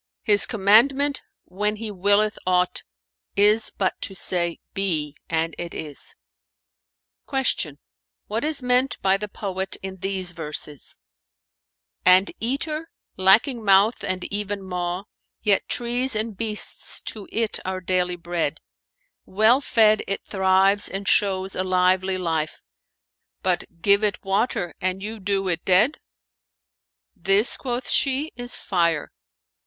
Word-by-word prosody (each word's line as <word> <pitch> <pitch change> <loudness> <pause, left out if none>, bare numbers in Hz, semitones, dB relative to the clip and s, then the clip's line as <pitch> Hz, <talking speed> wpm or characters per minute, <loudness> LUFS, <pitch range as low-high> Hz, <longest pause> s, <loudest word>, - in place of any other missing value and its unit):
'His 205 -2 +4
commandment 260 +7 +3 0.2
when 210 +3 -2
He 215 0 -6
willeth 205 +2 +2
aught, 180 0 +1 0.5
is 210 +2 +4
but 190 -2 -2
to 195 - 0
say, 175 -2 0
BE,—and 165 -3 -1
IT 170 -1 -5
IS.'"[FN#446] 60 - -6
Q 145 -4 -6 0.5
"What 220 +4 -3
is 300 -3 0
meant 250 +2 +2
by 190 0 +4
the 210 +1 -5
poet 190 -2 -4
in 190 0 -6
these 190 -1 -3
verses, 150 -3 -5 1.1
'And 185 +2 +6
eater 305 +7 -2 0.3
lacking 220 +6 +3
mouth 200 +3 +4
and 185 -1 -2
even 205 -1 -3
maw; 180 0 -3 0.2
* - - -56
Yet 205 -3 +2
trees 245 +1 0
and 215 0 -2
beasts 215 +1 -1
to 210 -3 -5
it 225 -2 -1
are 185 0 -3
daily 180 -1 0
bread: 170 -3 -3 0.7
Well 220 +7 +4
fed 220 -5 +4
it 195 - -2
thrives 190 +1 +2
and 195 +1 -5
shows 190 -1 +1
a 185 - -1
lively 185 0 +2
life, 160 -4 -2 0.4
* - - -61
But 185 -2 +1 0.2
give 200 +1 +4
it 205 -2 -1
water 195 - 0
and 185 +1 -1
you 220 +1 -5
do 195 0 -1
it 170 -2 -1
dead?'" 210 +11 +3 1.2
"This," 195 +6 +3
quoth 245 -1 -4
she, 280 +3 +1
"is 245 0 -4
Fire." 170 -5 0
195 Hz, 130 wpm, -23 LUFS, 180-215 Hz, 1.2 s, And